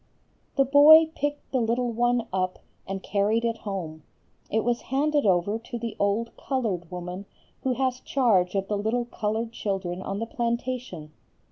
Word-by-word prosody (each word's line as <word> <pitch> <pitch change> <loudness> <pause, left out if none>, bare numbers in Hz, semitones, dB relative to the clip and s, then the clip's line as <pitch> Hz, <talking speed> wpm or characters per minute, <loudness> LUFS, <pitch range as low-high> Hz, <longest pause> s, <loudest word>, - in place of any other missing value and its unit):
"The 275 - +4
boy 310 +4 +8
picked 290 -1 -3
the 260 - +1
little 235 +2 0
one 240 0 +1
up 185 -1 -1 0.3
and 195 0 -4
carried 215 +3 +1
it 230 -1 -1
home. 175 -6 -5 0.5
It 220 0 +1
was 240 0 0
handed 290 -1 +2
over 190 +4 +2
to 235 +1 -7
the 230 -1 -5
old 205 +3 0
colored 210 - -2
woman 180 +2 -6 0.3
who 260 - 0
has 255 0 -1
charge 210 -11 +2
of 195 0 0
the 210 -1 -1
little 235 +4 0
colored 225 0 -2
children 190 -5 -3
on 195 +1 -4
the 225 - -2
plantation. 235 - -3
225 Hz, 160 wpm, -26 LUFS, 195-250 Hz, 0.5 s, boy